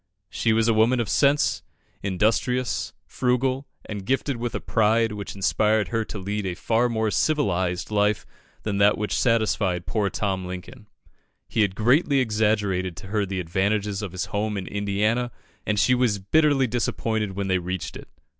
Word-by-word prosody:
She 115 - +1
was 110 0 +3
a 115 - +4
woman 115 +3 +3
of 115 - 0
sense, 145 +1 +2 0.4
industrious, 110 +2 0
frugal, 130 +2 0 0.2
and 105 -3 -6
gifted 135 +3 -1
with 120 0 -3
a - - -1
pride 115 +1 +2
which 105 -1 -6
inspired 105 +2 +1
her 115 -1 0
to 105 - -7
lead 100 +2 -3
a 90 - -3
far 115 +5 +1
more 110 -2 0
civilised 95 - 0
life 105 0 +1 0.4
than 100 -2 -1
that 100 +1 +5
which 105 0 -2
satisfied 105 -7 +1
poor 100 +3 0
Tom 95 -1 -2
Lincoln. 90 +6 -8 0.6
He 110 - 0
had 100 -3 +1
greatly 135 - +3
exaggerated 105 -6 0
to - - -9
her 105 -1 0
the 95 0 -3
advantages 100 +4 -1
of 100 -4 -5
his 95 0 -3
home 105 0 -1
in 95 - -4
Indiana, 105 +5 0 0.4
and 105 0 +1
she 115 +5 +4
was 125 -4 +2
bitterly 140 +7 +3
disappointed 110 -3 -1
when 100 0 -2
they 95 -1 +2
reached 90 +1 -4
it. - - -10
105 Hz, 170 wpm, -24 LUFS, 100-115 Hz, 0.6 s, that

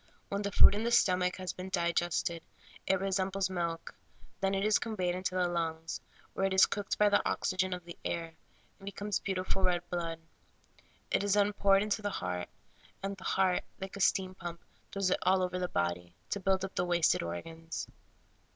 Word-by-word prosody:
When 200 0 -1
the 200 0 -2
food - - +8
in 210 +2 -1
the 235 - +1
stomach 180 -6 +3
has 185 -1 -4
been 185 +1 -7
digested, 170 -2 0 0.5
it 190 0 +3
resembles 195 0 0
milk; 170 -2 -3 0.5
then 195 0 +1
it 195 +1 0
is 215 -1 +4
conveyed 185 -6 -1
into 185 0 -2
the 180 -1 +2
lungs, 165 -2 -2 0.3
where 195 - +1
it 190 - -1
is 190 - +8
cooked 205 -1 -3
by 210 - +5
the 205 0 +4
oxygen 185 0 0
of 180 -1 -4
the 170 - -8
air, 165 -1 -3 0.5
and 195 - -12
becomes 200 0 -2
beauti 185 -2 -2
ful 190 - -1
red 175 -1 +1
blood; 165 -2 -2 0.9
it - - +2
is 205 0 +2
then 205 0 +3
poured 200 0 +4
into 210 +1 -1
the 205 - -1
heart, 90 - -3 0.5
and 195 0 -2
the 190 - -13
heart, 185 -2 +2 0.2
like 190 +1 -6
a 200 - -5
steam 185 0 +2
pump, 170 -2 -7 0.3
throws 195 -2 0
it - - +2
all 185 +1 +3
over 180 0 -1
the 180 - 0
body, 85 0 -2 0.2
to 200 - 0
build 190 0 +1
up 190 - -8
the - - 0
wasted 175 -2 +3
organs. 160 - -5
185 Hz, 195 wpm, -32 LUFS, 170-195 Hz, 0.9 s, food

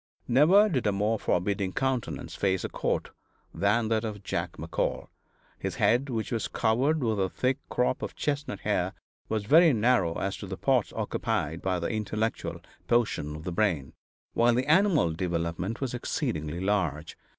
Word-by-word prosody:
Never 165 - +6
did 130 - 0
a - - +3
more 105 +3 0
forbidding 95 +1 0
countenance 130 -4 -2
face 95 -2 0
a - - -3
court - - -2 0.4
than 105 +3 +2
that 110 -1 +1
of 105 -3 -5
Jack 85 -3 -2
McCall; 80 +2 -3 0.5
his - - -3
head, 125 +5 +2
which 115 -3 -3
was 115 -3 -1
covered 130 +7 +1
with 110 -3 0
a 95 -1 +1
thick 130 +6 0
crop 125 +1 0
of - - -5
chestnut 145 -8 -2
hair, - - 0 0.4
was 110 -2 -1
very 160 +5 +6
narrow 110 -7 +2
as 95 0 -2
to 100 - -7
the 95 0 -5
parts 130 -5 +1
occupied 80 +3 -2
by 95 -1 0
the 85 - -2
intellectual 110 +1 -2 0.3
portion 110 -11 +1
of 75 - -8
the 90 - -4
brain, 85 -8 0 0.4
while 120 0 +4
the 125 +1 +1
animal 160 - +4
development 85 +5 -2
was 130 -3 -2
exceedingly 80 -9 -2
large. 90 -6 -1
110 Hz, 165 wpm, -28 LUFS, 90-125 Hz, 0.5 s, Never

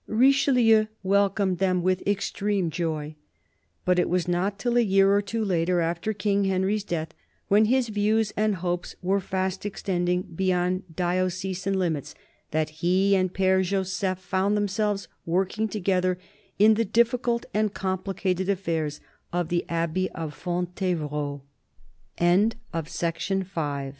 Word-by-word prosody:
Richelieu 245 -3 +4 0.2
welcomed 195 -1 +2
them 185 -2 +1
with 185 0 +1
"extreme 200 -2 0
joy." 155 -2 -3 0.7
But 180 0 +3
it 180 - +1
was 180 0 0
not 185 +3 0
till 240 +3 -1
a 240 - +5
year 195 -2 +4
or 205 - +3
two 220 +2 -2
later, 175 -1 +1
after 170 +5 -1
King 200 -1 0
Henry's 195 +2 +1
death, 160 -4 -3 0.4
when 210 +2 +5
his 250 +1 +2
views 215 +1 +1
and 215 -1 +1
hopes 175 0 -3
were 195 +2 +2
fast 190 0 -2
extending 180 -3 -1
beyond 180 0 -1
diocesan 185 +2 -1
limits, 165 -7 -2 0.3
that 155 0 -1
he 190 +3 +3
and 185 -1 +1
Pfere 190 0 +2
Joseph 190 0 -1
found 190 +3 0
themselves 205 0 -1 0.2
working 190 +5 0
together 185 -3 0 0.4
in 215 +2 +6
the 225 +2 +1
difficult 235 +2 +1
and 215 -1 +1
compl 190 0 -3
190 Hz, 115 wpm, -26 LUFS, 180-210 Hz, 0.7 s, in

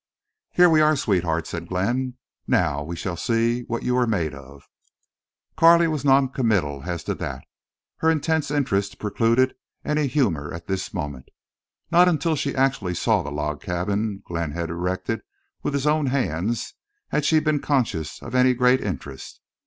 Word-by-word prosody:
"Here 180 0 +5
we 160 -2 +5
are, 155 0 +4
sweetheart," 85 - 0
said 85 +1 -6
Glenn. 120 +8 -1 0.3
"Now 70 - +1
we 85 +3 -6
shall 90 0 -4
see 115 +6 0
what 120 0 -3
you 125 - +1
are 125 -1 +2
made 85 -9 0
of." 70 0 -13 0.9
Carley 170 +1 +6
was 155 -3 -2
non 135 -1 +4
committal 100 - 0
as 85 -2 -3
to - - -2
that. 65 0 -5 0.5
Her 160 - +2
intense 160 -1 +1
interest 100 -9 0
precluded 115 +5 +2 0.3
any 150 -1 +1
humor 100 - 0
at 85 - -9
this 95 -1 -3
moment. 75 -8 -5 0.6
Not 175 +1 +6
until 160 -1 +1
she 140 -1 -2
actually 130 -9 +1
saw - - +2
the 70 - -5
log 75 0 -3
cabin 100 +3 -2
Glenn 85 -3 -3
had 85 0 -3
erected 90 +2 -2 0.4
with 145 - -2
his 140 0 -1
own 150 -1 +2
hands 115 - -1 0.4
had 150 - 0
she 155 +2 +4
been 155 -1 +1
conscious 120 - -1
of - - -8
any 125 0 +4
great 125 +1 +3
interest. 70 -8 -6
115 Hz, 165 wpm, -23 LUFS, 85-140 Hz, 0.9 s, Carley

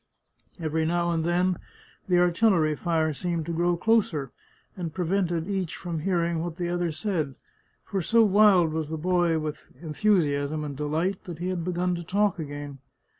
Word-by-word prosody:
Every 160 -1 -1
now 170 +1 +1
and 165 -1 0
then 175 +1 +1 0.5
the 180 - +2
artil 175 +5 +4
lery 155 -3 +2
fire 160 -2 0
seemed 170 +1 -2
to 170 - -3
grow 175 +1 +1
closer, 175 - +1 0.4
and 175 -4 -4
prevented 175 -1 -1
each 190 -4 -2
from 170 -2 -4
hearing 170 -1 0
what 170 0 -4
the 175 -1 -2
other 175 -1 0
said, 155 -4 -2 0.5
for 195 - -2
so 230 +7 +4
wild 195 -5 +5
was 160 -2 -2
the 160 - -3
boy 175 0 +2
with 155 -1 -5
enthusiasm 155 -4 +1
and 145 -2 -5
delight 160 +7 -1
that 175 -3 -7
he 175 +3 -3
had 180 -2 -2
begun 180 +1 0
to 170 0 -4
talk 200 +2 +1
again. 145 -2 -6
170 Hz, 175 wpm, -26 LUFS, 155-180 Hz, 0.5 s, wild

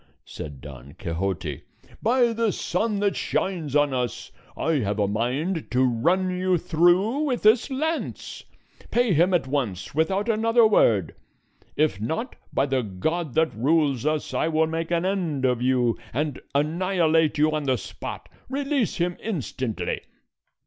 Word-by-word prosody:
said 75 -4 -8
Don 70 0 -11
Quixote. 85 -3 -3 0.4
"By 240 0 +3
the 225 -1 +1
sun 205 +4 -1
that 200 -1 +1
shines 165 -7 -2
on 145 -2 +3
us, 125 -4 -3 0.3
I 160 -3 +1
have 105 -3 -1
a 105 -1 +2
mind 130 - -1
to 125 +1 +2
run 170 +10 +2
you 185 0 +1
through 175 - +3
with 250 -5 -1
this 220 +6 +5
lance. 315 +5 -3 0.5
Pay 240 -4 +2
him 170 +4 +4
at 175 -6 +2
once, 120 -10 -3
without 190 +8 +1
another 230 +1 +4
word; 105 - +3 0.6
if 150 -10 +1
not, 160 - -3 0.2
by 135 - +1
the 135 -2 0
God 135 - -3
that 160 0 +2
rules 140 +1 +2
us, 155 0 -1
I - - +1
will 160 0 +2
make 165 +1 -3
an 170 0 0
end 170 -8 -1
of 125 -2 +1
you, 125 -2 +2
and 145 +1 -2
annihilate 160 0 +2
you 155 +1 +3
on 155 -1 -2
the 130 -2 +2
spot; 95 - -7 0.2
release 275 -3 0
him 175 0 -1
instantly." 130 - -3
155 Hz, 150 wpm, -25 LUFS, 125-190 Hz, 0.6 s, this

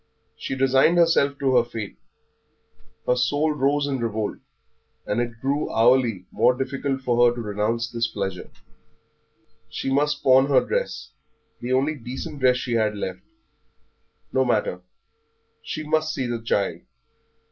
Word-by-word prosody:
She - - -5
resigned 135 +5 +3
herself 165 -5 +3
to 135 -2 +2
her 120 - +5
fate, 115 -4 -7 1.1
her 125 - +2
soul 145 +5 +1
rose 145 0 +1
in 135 -2 -2
revolt, 110 -2 -2 0.7
and 120 - 0
it 120 -1 -5
grew 140 +4 -1
hourly 115 -4 +3
more 125 - +3
difficult 135 0 -2
for 120 -1 +3
her 120 - -3
to - - -6
renounce 110 +2 -1
this 115 0 0
pleasure. 95 -4 -5 1.2
She 135 - -3
must 145 +1 +1
pawn 130 +1 +5
her 140 - +3
dress - - -3 0.5
the 125 +2 -2
only 135 +4 +2
decent 130 +1 -7
dress 130 -1 +4
she 120 -1 -3
had 110 -2 +1
left. 95 -2 -5 1.1
No 130 - +3
matter, 105 -7 0 0.8
she 155 - -5
must 155 0 0
see 130 - -2
the 120 -1 -3
child. 105 -3 -1
130 Hz, 145 wpm, -24 LUFS, 115-140 Hz, 1.2 s, her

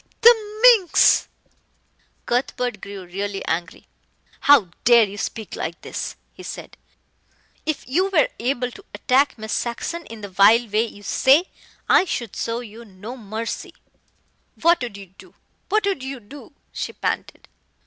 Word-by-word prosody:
Pah! - - -40 0.2
the 430 -2 0 0.2
minx!" 355 -4 +4 1.0
Cuthbert 245 -3 -1
grew 195 -2 -8
really 195 +2 -4
angry. 165 +1 -3 0.5
"How 280 - +5
dare 235 -1 +7
you 205 -1 -4
speak 220 0 -5
like 170 +1 -5
this?" - - -5 0.2
he - - -13
said. - - -8 0.9
"If 310 -5 -2
you 365 +9 +1
were 340 -6 +3
able 250 0 -1
to 395 - -13
attack 270 +1 +2
Miss 220 0 -5
Saxon 290 +8 -3
in 225 -1 -10
the 205 - -6
vile 205 +5 +5
way 215 +2 +1
you 205 -2 -13
say, 285 - +3 0.4
I - - +5
should 240 - -4
show 230 +1 -3
you 230 0 -11
no 210 +3 -10
mercy." 225 -1 -6 0.8
"What 340 -1 +4
would 235 -5 -5
you 200 - -10
do - - -16 0.3
what 430 0 +2
would 390 -8 -1
you 265 0 -5
do?" 275 +7 -13 0.2
she - - -5
panted. - - -4
235 Hz, 150 wpm, -22 LUFS, 205-285 Hz, 1.0 s, dare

